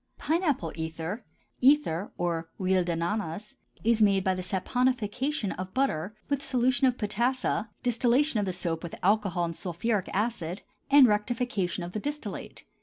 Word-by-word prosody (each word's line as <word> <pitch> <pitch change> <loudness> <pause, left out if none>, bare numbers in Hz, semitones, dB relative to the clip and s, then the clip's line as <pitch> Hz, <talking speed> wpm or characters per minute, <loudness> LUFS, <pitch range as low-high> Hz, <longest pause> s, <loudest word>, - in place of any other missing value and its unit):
PINE 330 +3 0
APPLE 275 - 0
ETHER 160 +6 -4 0.4
(ether 255 - +3
or 170 -1 -1
huile 185 -1 +2
d'ananas) 175 +3 -3 0.3
is 230 0 +3
made 200 -2 +4
by 190 - +2
the 185 - -3
saponification 245 +5 -1
of 185 +3 -6
butter 215 - 0
with 280 -1 0
solution 260 +1 +2
of 250 -1 +1
potassa, 225 +1 0
distillation 245 +2 +3
of 200 - -1
the - - 0
soap 170 -2 -2
with 170 - -6
alcohol 195 -3 +2
and 165 -1 -4
sulphuric 190 +5 -2
acid, 195 -4 -2 0.3
and 280 -1 +8
rectification 210 -4 0
of 175 - -6
the 215 - -3
distillate. 290 +6 -5
210 Hz, 150 wpm, -28 LUFS, 180-250 Hz, 0.4 s, and